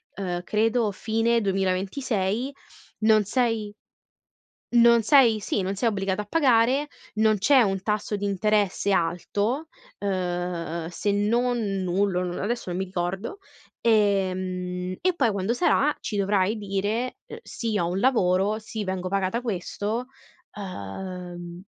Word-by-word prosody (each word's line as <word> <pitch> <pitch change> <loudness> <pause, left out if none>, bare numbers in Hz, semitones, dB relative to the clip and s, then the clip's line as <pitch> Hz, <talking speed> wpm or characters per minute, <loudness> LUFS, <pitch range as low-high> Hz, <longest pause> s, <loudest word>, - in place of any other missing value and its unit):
ehm, 180 -3 -3
credo, 220 +3 +1
"fine 225 +3 +1
2026, 195 +4 -1 0.5
non 215 -1 +4
sei 225 -2 0 1.0
non 235 -1 +6
sei" 230 -2 +5
sì, 200 - -1
"non 190 +2 -2
sei 230 +4 +1
obbligata 195 -1 -1
a - - -8
pagare, 260 +1 +3 0.3
non 215 0 +3
c'è 265 +6 +5
un 195 -4 +1
tasso 210 0 -1
di 205 0 -3
interesse 200 0 +1
alto" 200 - 0 0.3
ehm, 175 -3 -2
se 180 +4 -1
non 235 +5 +1 0.3
nullo, 185 0 +1
non 180 -1 -4
adesso, 230 -1 -2
non 175 - -3
mi 190 - -1
ricordo, 190 - -4 0.4
ehm, 185 -4 +1
"e 370 +1 +2
poi, 245 -8 +2
quando 200 +3 -1
sarà, 295 0 +2
ci 210 - -3
dovrai 200 +1 +2
dire: 210 +4 -2 0.2
"Sì, 225 -3 -3
ho 170 - +1
un 180 +2 -1
lavoro, 205 -4 +2
sì, 215 0 -5
vengo 185 -1 -3
pagata 195 +4 0
questo"" 220 +2 -3 0.5
ehm, 180 - -7
205 Hz, 130 wpm, -25 LUFS, 185-225 Hz, 1.0 s, non